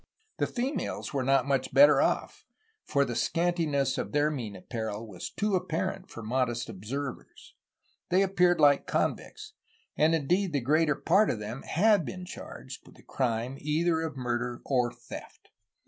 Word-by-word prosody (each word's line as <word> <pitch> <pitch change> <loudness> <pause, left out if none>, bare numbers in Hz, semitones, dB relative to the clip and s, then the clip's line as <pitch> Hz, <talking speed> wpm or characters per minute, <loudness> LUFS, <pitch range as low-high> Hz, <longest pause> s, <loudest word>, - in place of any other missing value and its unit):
The - - +2
females 260 - -3
were 135 - 0
not 135 0 +3
much 135 -2 -1
better 290 +1 +7
off; - - -1 0.4
for 140 -1 +1
the 120 - -4
scantiness 150 -1 0
of - - -4
their 150 +1 +2
mean 115 -8 -5
apparel 110 +2 -5
was 95 -5 -7
too 210 -1 -1
apparent 165 -3 -2
for 115 - -9
modest 120 0 -1
observers. 125 +8 -7 0.6
They 185 +2 +4
appeared 180 -3 +3
like 145 -2 +5
convicts, - - -2 0.4
and 160 +2 +3
indeed 175 +4 0
the 140 - +2
greater 150 +4 +2
part 195 +9 +3
of - - 0
them 110 +5 -6
had 205 +2 +3
been 180 +4 -6
charged 130 -6 -9
with - - -16
the - - -18
crime 125 0 -2
either 160 +2 +1
of 160 -3 -4
murder 120 -1 -2
or 125 -3 +1
theft. - - -11
140 Hz, 160 wpm, -29 LUFS, 120-170 Hz, 0.6 s, better